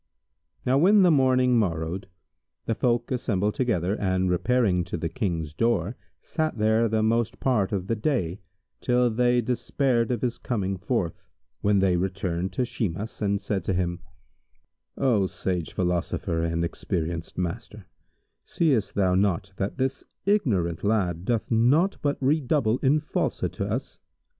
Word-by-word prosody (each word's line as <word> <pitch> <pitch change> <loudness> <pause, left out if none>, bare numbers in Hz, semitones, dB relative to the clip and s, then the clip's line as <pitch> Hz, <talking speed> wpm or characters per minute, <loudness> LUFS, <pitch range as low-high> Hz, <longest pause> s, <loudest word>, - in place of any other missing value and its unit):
Now 130 +2 +3
when 195 +5 +6
the 180 - +5
morning 130 -3 +4
morrowed, 85 -1 -2 0.6
the 115 - 0
folk 120 +1 0
assembled 105 -5 0
together 100 -8 0
and 95 -3 0
repairing 95 -1 +2
to - - -4
the 85 0 -3
King's 80 -4 -3
door, 115 +1 0 0.2
sat 155 -4 -2
there 110 +2 +3
the 110 0 +1
most 115 0 0
part 110 -8 +1
of 95 -3 -2
the 115 - -1
day, 105 - -1 0.4
till 125 -1 +2
they 120 +2 +2
despaired 125 0 0
of 125 -2 -2
his 120 -2 -1
coming 100 -5 -2
forth, 95 -4 -2 0.4
when 105 0 +3
they 95 -2 +3
returned 95 -1 -2
to 125 - 0
Shimas 105 -2 -4
and 100 -1 +1
said 95 -3 -2
to 95 - 0
him, 85 -1 -1 1.0
"O 115 -8 +2
sage 90 -3 -3
philosopher 85 -2 -1
and 85 0 0
experienced 85 -1 -4
master, 90 -2 -4 0.6
seest 135 -11 0
thou 95 -2 +2
not 95 +1 +1
that 100 +6 -3
this 130 0 -1 0.2
ignorant 100 - +1
lad 95 -5 0
doth 115 0 -1
naught 135 - +3
but 145 -2 0
redouble 135 -4 +1
in 145 +3 +3
falsehood 155 - -2
to - - -3
us? - - -4
105 Hz, 150 wpm, -26 LUFS, 90-125 Hz, 1.0 s, when